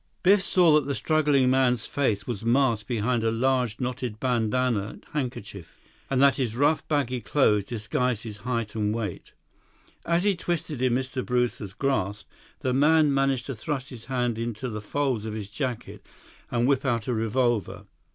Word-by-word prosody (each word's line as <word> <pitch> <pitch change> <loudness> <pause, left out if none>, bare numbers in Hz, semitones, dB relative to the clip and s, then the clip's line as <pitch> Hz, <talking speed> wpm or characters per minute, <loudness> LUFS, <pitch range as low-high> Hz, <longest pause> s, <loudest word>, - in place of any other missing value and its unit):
Biff 195 +2 +5
saw 175 -4 +4
that 150 -2 +3
the 140 - -1
struggling 145 -5 +2
man's 125 -3 +2
face 110 -8 -1
was 115 -4 -4
masked 115 -3 +2
behind 120 0 0
a 115 - +2
large, 125 -1 0
knotted 125 -3 -3
bandanna 120 -3 0 0.2
handkerchief, 115 - -5 0.3
and 135 - +1
that 140 0 +5
his 120 -5 -1
rough, 145 +5 +2
baggy 130 -5 0
clothes 105 -9 +2
disguised 115 +1 -2
his 110 -3 -7
height 115 0 -3
and 105 -1 -1
weight. 105 -6 -5 0.7
As 170 +1 +1
he 205 -1 +2
twisted 170 -5 -3
in 130 -2 +2
Mr. 130 0 -2
Brewster's 125 -5 -1
grasp, 105 -7 -1 0.3
the 130 - 0
man 150 +2 +4
managed 135 -2 +1
to 135 - -4
thrust 135 +3 -4
his 120 -4 -10
hand 125 -3 -1
into 115 +2 -3
the 105 -2 -5
folds 130 -1 -1
of 110 -1 -4
his 105 -2 -6
jacket 125 +1 -5 0.5
and 120 0 +1
whip 135 -1 +2
out 120 -5 0
a 125 - -1
revolver. 115 -1 0
125 Hz, 170 wpm, -26 LUFS, 110-135 Hz, 0.7 s, Biff